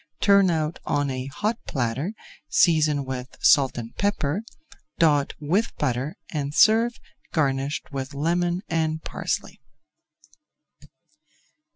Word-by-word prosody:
Turn 200 -2 +5
out 160 -1 -1
on 145 -1 0
a 130 0 -4
hot 210 - -2
platter; 135 - -2 0.4
season 155 -5 +3
with 130 0 -6
salt 135 -4 +4
and 115 -1 -7
pepper, 200 -4 0 0.6
dot 150 -4 +3
with 180 +10 0
butter, 130 +2 -1 0.2
and 145 -1 -3
serve 230 +2 +4 0.3
garnished 140 -1 -1
with 135 0 -5
lemon 175 +4 0
and 160 -1 -1
parsley. - - -4
150 Hz, 105 wpm, -24 LUFS, 135-175 Hz, 0.6 s, Turn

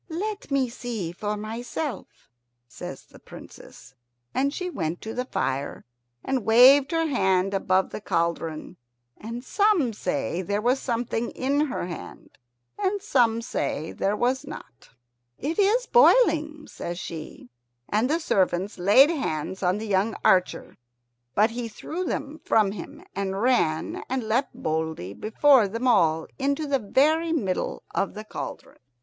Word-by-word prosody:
"Let 405 +5 -4
me 275 -2 +2
see 235 -7 -5
for 210 +4 -3
myself," 235 +6 -6 0.4
says - - -9
the - - -17
Princess, - - -13 0.4
and 275 +2 +1
she 365 +4 -4
went 170 - -3
to 220 - -6
the 250 - -2
fire 140 - -3 0.4
and 265 -3 0
waved 260 +5 +7
her 330 0 +1
hand 190 -8 +1
above 190 -1 +1
the - - -6
cauldron. 165 -4 -2 0.4
And 230 +3 -7
some 370 - +2
say 175 - -2
there 200 +3 -1
was 245 +5 +2
something 235 -1 -2
in 285 +3 0
her 255 - -3
hand, 175 -2 -9 0.4
and 405 0 0
some 240 - +2
say 160 -7 -3
there 200 +2 -1
was 255 +4 +1
not. 275 - -11 0.5
"It 315 +7 -3
is 435 +5 +3
boiling," 320 -12 +4
says 175 0 -6
she, 160 -7 -8 0.4
and 220 +5 +1
the 315 - +2
servants 190 - 0
laid 230 - +6
hands 190 - -3
on 185 +1 +1
the 220 - -5
young 205 +2 +1
archer; 185 -1 +2 0.6
but 215 +2 +4
he 235 0 -4
threw 320 - -5
them 310 -1 -4
from 210 -3 +3
him, 275 - -9
and 195 -1 -2
ran 200 -10 +1
and 260 -1 -1
leapt 230 +5 0
boldly 160 - -3
before 230 - +4
them 230 +6 -2
all 160 -9 +3
into 280 +3 0
the 280 -2 +1
very 310 +9 +2
middle 200 - -2
of 195 - -1
the 215 - -6
cauldron. 215 - -8
230 Hz, 145 wpm, -25 LUFS, 190-280 Hz, 0.6 s, waved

